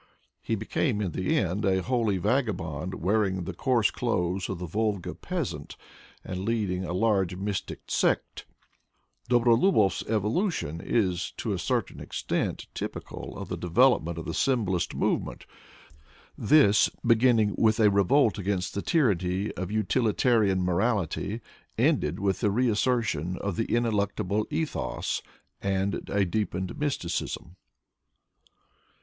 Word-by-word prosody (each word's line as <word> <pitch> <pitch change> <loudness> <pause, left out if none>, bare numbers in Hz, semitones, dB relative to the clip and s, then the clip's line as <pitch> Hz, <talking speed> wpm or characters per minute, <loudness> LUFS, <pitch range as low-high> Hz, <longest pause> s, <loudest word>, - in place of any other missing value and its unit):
He 115 - -1
be 110 +1 -6
came 120 -5 0
in 100 -4 -1
the 95 +2 0
end 95 +3 0
a 95 -2 +2
holy 115 -6 +1
vagabond, 90 - -1
wearing 95 0 0
the 95 +2 -5
coarse 120 +3 +2
clothes 95 -6 -1
of 95 - -3
the 90 - -5
Volga 105 +1 -1
peasant, - - -5 0.5
and 95 - -5
leading 100 -4 -1
a 90 - -4
large 95 -2 +1
mystic 100 +1 -4
sect. - - 0 0.8
Dobrolubov's 120 - +4
evolution 110 - -1
is 90 -6 0
to - - -2
a - - -3
certain - - -1
extent - - -3
typi - - -5
cal - - -8
of - - -6
the - - -2
development 90 -3 +3
of 80 - -5
the 80 - -4
symbolist 105 -9 0
movement. - - -1 0.9
This, 140 -9 +5 0.2
beginning 115 -3 +4
with 110 0 +3
a 105 -2 +5
revolt 105 +4 +3
against 95 -1 -2
the 100 - -2
tyranny 100 - +1
of 95 0 -5
utilitarian 110 -1 +2
morality, 100 +3 0 0.4
ended 75 +5 +1
with 95 -2 0
the 105 - +2
reassertion 110 - +1
of 100 -1 -3
the 115 - 0
ineluctable 105 -3 0
ethos 155 0 -2 0.4
and 100 0 -1
a 100 -1 +2
deepened 95 - -2
mysticism. 90 - -3
100 Hz, 130 wpm, -27 LUFS, 90-115 Hz, 0.9 s, This